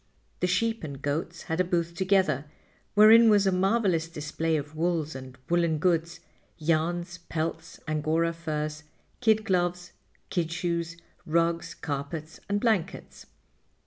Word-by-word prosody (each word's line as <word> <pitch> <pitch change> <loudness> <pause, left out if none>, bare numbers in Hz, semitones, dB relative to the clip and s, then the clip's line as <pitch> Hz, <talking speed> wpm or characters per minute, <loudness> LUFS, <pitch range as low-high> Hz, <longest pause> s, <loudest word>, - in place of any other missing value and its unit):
The 180 - +1
sheep 225 +4 0
and 140 -3 -6
goats 160 +4 -3
had 160 +2 -3
a - - +5
booth 170 -1 -1
together, 185 -6 +2 0.5
wherein 220 +2 +8
was 205 -2 +5
a 190 - +3
marvelous 190 -3 +2
display 160 +1 -1
of 150 +1 -6
wools 160 -1 0
and 130 -1 -9
woolen 170 -2 +2
goods, 170 0 0 0.4
yarns, 170 +2 -1
pelts, 160 0 -3
angora 155 +2 +1
furs, 155 -2 -4 0.4
kid 220 -2 +3
gloves, 180 -2 0 0.4
kid 165 -2 -1
shoes, 170 -1 -2 0.3
rugs, 170 +1 0
carpets 150 +2 -5
and 205 0 +1
blankets. 205 -6 -1
170 Hz, 130 wpm, -27 LUFS, 155-180 Hz, 0.5 s, wherein